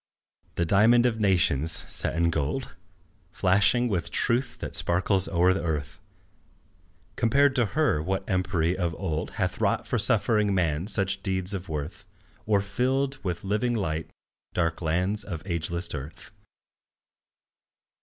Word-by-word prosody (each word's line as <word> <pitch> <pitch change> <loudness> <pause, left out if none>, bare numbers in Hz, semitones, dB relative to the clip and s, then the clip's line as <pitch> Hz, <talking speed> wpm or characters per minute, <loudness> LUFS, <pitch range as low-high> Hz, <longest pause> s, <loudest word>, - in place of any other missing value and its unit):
The 85 - 0
diamond 110 +7 +4
of 115 -2 0
nations, 85 -7 +2
set - - -2
in 85 0 +2
gold, 70 -4 -2 0.6
Flashing 105 +6 +2
with 90 -7 -2
truth 125 +2 -1
that - - -6
sparkles 95 +2 +2
o'er 90 +1 +3
the 95 - -3
earth, 75 -3 -3 1.1
Compared 135 +3 +3
to 120 -3 +2
her 150 - +2
what 95 +4 -2
empery 90 -3 0
of 85 -3 -2
old 80 -4 -3
Hath - - -2
wrought - - +1
for - - 0
suffering 105 -3 +3
man 85 -1 0
such 95 -2 0
deeds 95 -1 -1
of 95 -2 -5
worth, 80 +6 -6 0.4
Or 105 -2 +3
filled 130 +6 -1
with 90 -3 -3
living 110 +5 0
light 80 -7 -2 0.5
dark 85 -1 -1
lands 90 +6 -1
of 85 -6 -6
ageless 85 -1 -2
dearth? 75 0 -6
95 Hz, 135 wpm, -26 LUFS, 85-105 Hz, 1.1 s, diamond